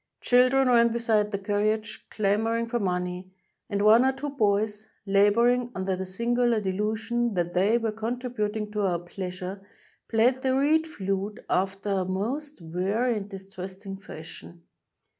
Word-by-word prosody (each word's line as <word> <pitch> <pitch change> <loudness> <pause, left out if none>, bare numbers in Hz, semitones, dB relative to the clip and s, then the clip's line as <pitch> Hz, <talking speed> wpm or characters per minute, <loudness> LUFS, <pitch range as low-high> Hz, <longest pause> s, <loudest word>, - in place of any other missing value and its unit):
Chil 250 +1 +4
dren 270 0 +3
ran 235 -1 +5
beside 220 -3 +1
the 200 - -1
carriage 210 +2 -1
clamoring 220 +3 0
for 240 +1 -2
money, 180 -1 -2 0.4
and 200 -1 0
one 220 +3 +7
or 265 - +4
two 275 +2 -5
boys, 210 -3 0 0.2
laboring 235 +5 +3
under 190 0 -1
the 190 0 -5
singular 235 +3 +1
delusion 220 +4 -1
that 175 -1 -1
they 200 +6 +3
were 225 -2 -1
contributing 220 -2 -3
to 210 0 -2
our 185 -3 +1
pleasure, 180 +2 -6 0.5
played 245 +3 +3
the 260 0 +1
reed 310 +4 +3
flute 195 -5 -4
after 195 +2 0
a 190 -1 +1
most 230 - -3
weary 195 +9 0
and 205 -1 -5
distressing 195 0 -8
fashion. 170 -2 -11
210 Hz, 145 wpm, -26 LUFS, 195-235 Hz, 0.5 s, one